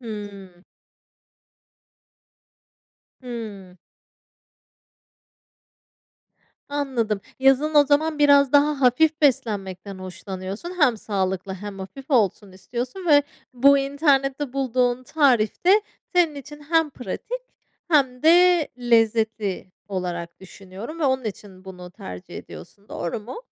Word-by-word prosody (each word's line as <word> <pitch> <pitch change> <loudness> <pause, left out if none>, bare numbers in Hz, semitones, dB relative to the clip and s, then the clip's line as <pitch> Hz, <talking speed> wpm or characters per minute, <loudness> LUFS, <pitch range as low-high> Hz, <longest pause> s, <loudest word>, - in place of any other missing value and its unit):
Hımm. 200 -5 -9 2.6
Hımm. 215 -7 -8 2.9
Anladım, 250 -8 -1 0.2
yazın 270 +3 +3
o 290 -1 +7
zaman 300 +1 +1
biraz 285 -2 +5
daha 290 0 +3
hafif 300 +6 +3
beslenmekten 200 -7 -1
hoşlanıyorsun. 185 - -7
Hem 250 -6 +4
sağlıklı 190 -2 -3
hem 200 +1 -8
hafif 265 +10 -10
olsun 205 -5 +1
istiyorsun 250 - -6
ve 290 -1 +6 0.3
bu 280 +3 +5
internette 275 -1 0
bulduğun 255 -2 0
tarif 255 -4 +1
de 405 +3 +6 0.3
senin 335 -4 +3
için 295 +1 -10
hem 325 -2 +3
pratik 480 - -6 0.5
hem 265 -6 +2
de 345 0 +5
lezzetli 220 -5 +1 0.2
olarak 175 -3 -5
düşünüyorum 195 - -10
ve - - +1
onun 260 -2 +1
için 195 -3 -8
bunu 180 -2 -10
tercih 90 - -10
ediyorsun. 200 - -13
Doğru 175 +5 -4
mu? 250 - -9
245 Hz, 100 wpm, -23 LUFS, 195-285 Hz, 2.9 s, o